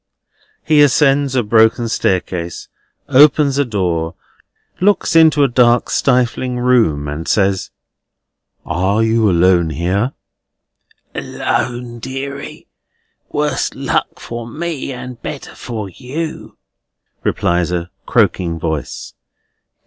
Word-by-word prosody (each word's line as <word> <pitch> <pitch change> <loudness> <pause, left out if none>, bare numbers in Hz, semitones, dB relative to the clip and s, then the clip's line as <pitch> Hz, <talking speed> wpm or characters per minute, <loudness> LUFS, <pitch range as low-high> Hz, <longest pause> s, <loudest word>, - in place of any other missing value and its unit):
He 155 -2 +4
ascends 140 -1 +3
a 125 - +2
broken 110 +2 +3
staircase, 90 -5 -2 0.4
opens 140 0 +5
a - - +4
door, 90 -7 -2 0.6
looks 200 -2 +2
into 160 -3 +6
a - - +5
dark 120 -1 +3
stifling 125 -1 +1
room, 115 -13 +2
and 75 +3 -5
says: 95 -2 +1 1.0
"Are 95 +5 +1
you 110 -1 +2
alone 90 -1 +3
here?" 95 - -1 1.0
"Alone, 120 -1 -3
deary; 140 +3 -6 0.7
worse 150 -2 -1
luck - - -2
for 120 0 -7
me, 155 +1 -4
and 125 -1 -8
better 145 - -7
for 110 -4 -6
you," 140 - -6 0.7
replies 85 0 0
a 90 0 -3 0.2
croaking 95 -7 +1
voice. 80 -4 -4
120 Hz, 105 wpm, -17 LUFS, 90-135 Hz, 1.0 s, into